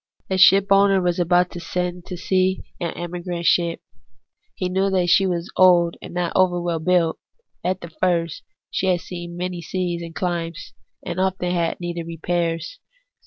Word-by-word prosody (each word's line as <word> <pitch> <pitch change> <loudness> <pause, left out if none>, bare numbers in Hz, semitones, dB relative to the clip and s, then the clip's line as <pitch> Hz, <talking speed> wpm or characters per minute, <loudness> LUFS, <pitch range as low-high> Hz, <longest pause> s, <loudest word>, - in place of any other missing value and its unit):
A 190 - +2
SHiPOwis^ER 195 +1 +6
was 180 -1 0
about 175 +1 +3
to 175 - -7
send 180 0 -3
to 180 - -5
sea 185 +1 +1 0.2
an 170 - -2
emigrant 175 0 -5
sliip. 170 -1 +2 0.7
He 185 - -2
knew 190 +2 +1
that 185 -2 +1
slie 190 +2 +4
was 175 0 -3
old, 175 -2 +5
and - - -9
not 175 -1 -2
over 180 -2 +3
well 170 -1 -1
built 170 -1 +2 0.4
at 185 0 -1
the 170 - -9
first; 170 -1 0
that - - -49 0.2
she 190 - -1
had 180 -2 +2
seen 175 -1 -7
many 180 -1 -3
seas 175 0 -3
and 165 -1 -8
chmes, 170 -2 -3 0.3
and 175 +1 -4
often 185 -1 0
had 170 -2 -1
needed 175 -1 -4
repairs. 170 - -2
175 Hz, 170 wpm, -22 LUFS, 170-185 Hz, 0.7 s, SHiPOwis^ER